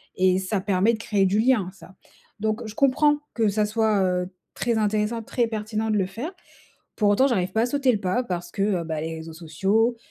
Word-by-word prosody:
et 185 0 +3
ça 190 +1 -2
permet 200 +3 +2
de - - -2
créer 205 -3 +1
du 200 +3 +1
lien, 220 -6 +2
ça. 190 0 -15 0.5
Donc, 215 +2 -1
je 215 - -8
comprends 290 +2 +3 0.2
que 220 -3 +2
ça 210 +1 +1
soit, 215 -2 +1
heu, 180 0 0 0.3
très 235 -2 0
intéressant, 215 +2 0
très 240 +2 0
pertinent 215 0 -3
de 210 - +2
le 190 - +1
faire. 240 - -6 0.7
Pour 210 -2 +2
autant, 260 +7 +4
j'arrive 185 -6 0
pas 220 - +1
à - - +2
sauter 270 -1 +2
le 210 - -1
pas 195 +7 0
parce 175 -3 -4
que, 195 - -2
heu, 190 -5 0
bah, 160 -1 -3
les 160 0 -4
réseaux 160 0 -8
sociaux, 195 +9 0
210 Hz, 220 wpm, -24 LUFS, 185-230 Hz, 0.7 s, autant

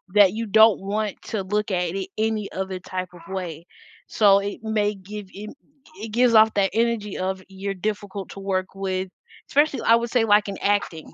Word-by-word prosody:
that 200 -2 +6
you 225 0 -3
don't 220 +1 +6
want 205 +1 -3
to 210 -4 -4
look 210 +2 -1
at 180 0 -1
it 195 -1 -4
any 220 -1 -1
other 190 -1 -4
type 185 0 -5
of 175 - -13
way. 170 -3 -5 0.4
So 200 -2 +5
it 200 +1 -5
may 210 -1 0
give 200 +1 -9
I 210 +2 -7 0.5
it 225 - -5
gives 240 +1 +3
off 220 0 +6
that 195 -1 +2
energy 225 -3 0
of 190 0 -3
you're 195 +1 -5
difficult 200 0 -4
to - - -9
work 190 -1 -1
with, 190 -1 -3 0.4
especially 290 -1 +2
I 230 - +5
would 235 0 -1
say, 245 -3 +3
like, 210 -1 +4
in 195 - -5
acting, 200 -6 -1
200 Hz, 195 wpm, -23 LUFS, 190-215 Hz, 0.5 s, that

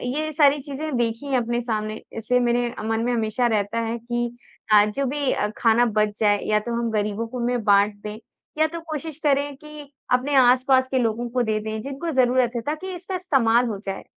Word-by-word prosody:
ये 310 +1 -2
सारी 290 -1 +4
चीज़ें 285 +1 -4
देखी 230 +2 -1
हैं 270 -2 +1
अपने 240 0 -1
सामने 215 -2 -3 0.2
इसलिए 250 +3 +1
मेरे 240 0 +1 0.2
मन 225 0 0
में 245 - 0
हमेशा 230 +1 0
रहता 215 0 0
है 230 +1 -2
कि 240 0 -3 0.3
अ, 210 -1 +7
जो 270 +6 -2
भी 280 +1 -1
अ, 210 - 0
खाना 235 +1 +4
बच 215 -2 0
जाए 205 -2 +3
या 210 0 +2
तो 235 +2 -5
हम 235 - -1
गरीबों 210 +1 -1
को 250 +2 -6
में 245 -1 -1
बाँट 205 0 +4
दें 210 0 -6 0.4
या 315 0 +4
तो 335 +1 -6
कोशिश 315 -1 -6
करें 285 -1 +1
कि 300 -1 -11 0.2
अपने 265 +3 +1
आस-पास 260 +1 +4
के 260 - +1
लोगों 235 +1 -1
को 250 0 0
दे 215 -1 0
दें 220 0 -4
जिनको 275 +6 -5
ज़रूरत 255 -3 +2
है, 235 - -1
ताकि 315 +8 -4
इसका 365 +2 -6
इस्तेमाल 250 -10 +2
हो 215 - -3
जाए। 195 -1 -5
240 Hz, 210 wpm, -23 LUFS, 220-275 Hz, 0.4 s, अ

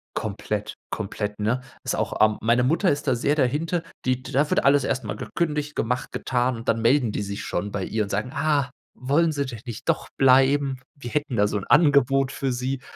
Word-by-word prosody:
Komplett, 105 0 -3 0.2
komplett, 105 0 -4
ne? 115 +5 0 0.2
Ist - - -1
auch - - -2
ähm, 110 -1 0
meine 120 +3 +3
Mutter 165 +8 +2
ist 145 +1 -3
da 130 - +3
sehr 140 +5 +1
dahinter. 155 +5 0 0.2
Die 130 0 0
da 145 +4 0
wird - - +2
alles 140 0 +4
erstmal 125 -5 -2
gekündigt, 150 -3 -2
gemacht, 125 +2 -2
getan. 125 -1 0
Und 115 +2 -9
dann 115 0 +1
melden 120 -1 +3
die - - -3
sich 100 0 -5
schon 100 +4 -3
bei 100 -2 -3
ihr 110 +3 -2
und 100 - -6
sagen: 105 +5 -2
„Ah, 140 -3 +1 0.2
wollen 150 +6 +2
Sie 140 -2 -1
denn 120 -4 -7
nicht 120 +3 -8
doch 165 - 0
bleiben? 135 0 +4 0.2
Wir 120 -5 -8
hätten 145 -4 -1
da 105 -1 +3
so 105 - -1
'n 100 - -5
Angebot 135 -3 +4
für 135 -1 -2
sie." 130 +2 -2
130 Hz, 210 wpm, -24 LUFS, 115-145 Hz, 0.2 s, alles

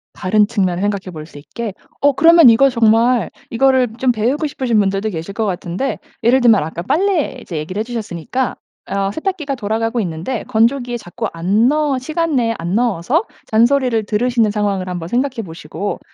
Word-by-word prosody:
다른 205 +3 +2
측면을 190 -5 -1
생각해 200 -2 -2
볼 155 -1 -8
수 145 - -14
있게. 190 +9 -6 0.3
어 285 0 +4
그러면 330 -1 +7
이거 275 +5 +5
정말 235 0 +3 0.2
이거를 260 +1 +3
좀 255 -1 +3
배우고 250 +8 0
싶으신 250 -6 0
분들도 195 +1 0
계실 165 +3 -6
거 220 - -1
같은데 185 +6 -3 0.2
예를 255 +3 +4
들면 225 -8 +5
아까 160 +2 -5
빨래 310 - 0
이제 170 - -6
얘기를 165 +6 -4
해 - - 0
주셨으니까 230 +1 -3 0.3
어 195 0 -1
세탁기가 315 - -3
돌아가고 225 +1 -2
있는데 180 +6 -4
건조기에 240 +2 +1
자꾸 225 +2 -5
안 195 +8 +2
넣어 295 -1 +1
시간 315 +3 -2
내에 230 -3 +1
안 175 +3 -2
넣어서 240 - +1 0.2
잔소리를 235 0 +2
들으시는 230 +1 +1
상황을 200 -3 -1
한번 175 -2 -5
생각해 250 0 -1
보시고 165 +4 -5
225 Hz, 395 characters per minute, -17 LUFS, 195-260 Hz, 0.3 s, 그러면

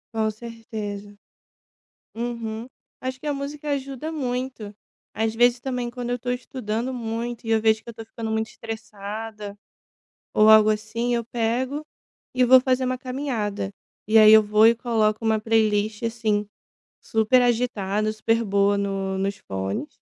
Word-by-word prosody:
Com 220 -1 +1
certeza. 215 -2 -7 1.0
Uhum. 230 -1 -4 0.3
Acho 260 0 -5
que - - -9
a 290 - 0
música 285 +2 -6
ajuda 275 +2 -4
muito. 250 -7 -4 0.4
Às 220 0 -1
vezes 245 +1 +4
também 250 -2 -3
quando 245 0 -5
eu 245 0 -1
tô 245 +1 -4
estudando 245 -1 -3
muito 235 0 -4
e 225 - -2
eu 225 - +3
vejo 220 0 +3
que - - -9
eu - - -10
tô 225 - -8
ficando 225 -1 -5
muito 220 0 0
estressada 215 -1 -7 0.8
ou 215 0 +5
algo 215 0 +8
assim, 225 +3 -1
eu 235 - 0
pego 245 +6 -1 0.5
e 255 - +4
vou 260 +1 +9
fazer 255 0 +1
uma 255 - 0
caminhada. 250 -7 -3 0.4
E 220 - +3
aí 215 0 +9
eu 220 - +9
vou 210 +1 +5
e 230 - +6
coloco 225 -2 0
uma 220 -1 +2
playlist, 215 -1 +1
assim, 220 -3 0 0.5
super 225 +3 +3
agitada, 215 -4 0
super 225 +2 0
boa 200 0 +2
no 195 -1 -2
nos 195 +1 -2
fones 95 - -5
225 Hz, 155 wpm, -24 LUFS, 215-245 Hz, 1.0 s, vou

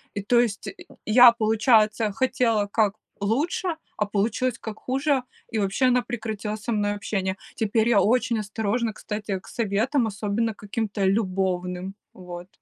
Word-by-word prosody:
И, 200 - -2
то 240 +4 +3
есть, 230 -4 -1 0.4
я, 240 +2 +8
получается, 220 -1 +3
хотела 230 -4 +1
как 205 0 +1 0.3
лучше, 310 - 0 0.2
а 210 - +1
получилось 220 +4 0
как 215 -1 -7
хуже, 270 0 0 0.3
и 220 - +1
вообще 200 +6 +1
она 250 0 +3
прекратила 220 -3 -4
со 220 +3 -5
мной 205 -1 +1
общение. 195 -1 -2 0.2
Теперь 220 +1 +1
я 210 -4 +5
очень 230 +2 +2
осторожно, 220 +2 -1
кстати, 210 -2 -4
к - - -19
советам, 230 +4 0
особенно 215 +2 -1
каким-то 205 0 -3
любовным, 185 -2 -1 0.2
вот. 180 -1 -9
215 Hz, 145 wpm, -25 LUFS, 200-235 Hz, 0.4 s, я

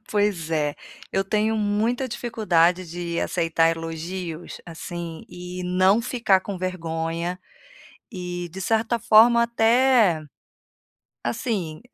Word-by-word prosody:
Pois 205 -6 0
é, 150 -2 0 0.4
eu 195 - +2
tenho 215 +2 +1
muita 220 +5 0
dificuldade 185 -7 +1
de 170 -1 -3
aceitar 165 -1 +2
elogios, 165 +1 -6
assim, 170 0 -7
e 180 +1 -7
não 185 +4 +3
ficar 225 -6 +2
com 195 0 -6
vergonha, 170 -1 -3 0.7
e, 180 -2 -5
de 190 - -8
certa 225 +3 +1
forma 235 +3 +6
até, 235 -6 +3 1.0
assim, 180 - -3
185 Hz, 105 wpm, -24 LUFS, 170-220 Hz, 1.0 s, forma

